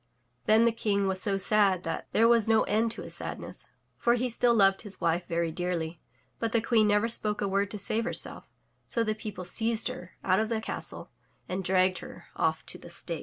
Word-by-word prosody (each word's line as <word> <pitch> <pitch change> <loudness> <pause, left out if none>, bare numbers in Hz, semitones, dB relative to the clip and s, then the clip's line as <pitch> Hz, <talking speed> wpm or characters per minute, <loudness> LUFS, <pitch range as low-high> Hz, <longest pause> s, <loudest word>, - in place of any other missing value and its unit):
Then 220 +2 +5
the 235 - +4
King 205 -3 0
was 190 -1 0
so 195 0 0
sad 195 -2 +3
that 165 0 -4
there 225 +1 +4
was 230 -2 +4
no 225 -1 +4
end 220 +2 +1
to - - -8
his - - -5
sadness, - - -5 0.3
for 235 0 +3
he 250 +1 -1
still 235 +1 +3
loved 195 -2 +4
his 205 -3 -6
wife 170 +1 0
very 170 -1 -1
dearly, 170 -1 -3 0.4
but 230 -1 -2
the 230 - +4
queen 220 -2 +3
never 210 +2 +3
spoke 215 -2 +1
a 200 - 0
word 195 0 0
to 210 - -4
save 215 +3 0
herself, - - 0 0.4
so 230 - +2
the 215 -1 0
people 210 -4 -7
seized 225 +5 0
her 180 0 -9
out 185 +1 +3
of 220 0 0
the 225 -2 0
castle 220 - -5 0.4
and 185 +1 -3
dragged 185 0 +2
her - - -12
off - - 0
to - - -6
the - - -12
stake. - - -3
210 Hz, 220 wpm, -28 LUFS, 185-225 Hz, 0.4 s, Then